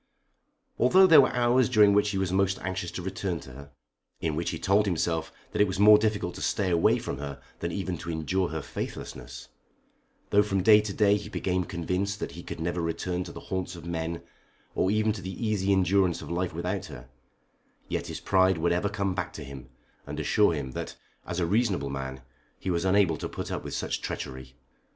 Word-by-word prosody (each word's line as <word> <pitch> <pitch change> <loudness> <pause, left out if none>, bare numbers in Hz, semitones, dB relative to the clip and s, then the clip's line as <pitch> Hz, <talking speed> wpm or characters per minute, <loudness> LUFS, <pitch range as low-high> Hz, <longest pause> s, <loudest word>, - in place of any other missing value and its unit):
Although 185 +11 +6
there 160 -6 +9
were 130 - +2
hours 125 -1 +3
during 105 -2 +6
which 105 +1 +3
he 100 - -2
was 95 -2 0
most 95 0 +2
anxious 95 -1 -3
to 90 - -5
return 95 -2 -3
to 65 - -12
her, 70 +3 -12 0.5
in 80 -2 -1
which 85 +2 -1
he - - -3
told 100 +2 +2
himself 80 -2 -1 0.2
that - - 0
it 105 - +5
was 95 +1 -3
more 105 +1 +8
difficult 105 -5 -1
to - - -9
stay 95 -4 0
away 85 -1 +4
from - - -5
her 70 -1 -6 0.2
than 85 - -3
even 95 -2 -3
to 85 - -7
endure 85 +3 0
her 80 -2 -4
faithlessness; - - -7 0.8
though 100 - +6
from 100 -3 0
day 105 +1 +7
to 105 -1 -4
day 105 0 +3
he 105 - -8
became 90 -1 -1
convinced 95 +5 -2
that - - -4
he - - -9
could - - -7
never 85 +2 -2
return 90 +2 -2
to - - -8
the - - -9
haunts 95 -1 -2
of 85 -1 -10
men 85 0 -3 0.5
or 95 - +1
even 110 +1 +2
to 100 - -7
the 95 -1 -6
easy 100 -2 +1
endurance 95 -2 +3
of - - -8
life 90 +1 -1
without 90 +4 -3
her, - - -10 0.8
yet - - -3
his - - -5
pride 95 -1 +3
would 85 +2 +1
ever 90 +4 +1
come 100 -2 -1
back 90 -1 -3
to 80 - -7
him 70 -2 -10 0.4
and 75 +2 -5
assure 100 +5 +3
him 70 -3 -4
that - - -6 0.3
as 90 - -3
a 85 - +1
reasonable 95 - +1
man 65 -1 -5 0.3
he 95 - -3
was 85 +1 0
unable 95 -4 +3
to - - -5
put - - -6
up - - -3
with - - -5
such - - -2
treachery. 65 0 -6
95 Hz, 215 wpm, -27 LUFS, 85-100 Hz, 0.8 s, there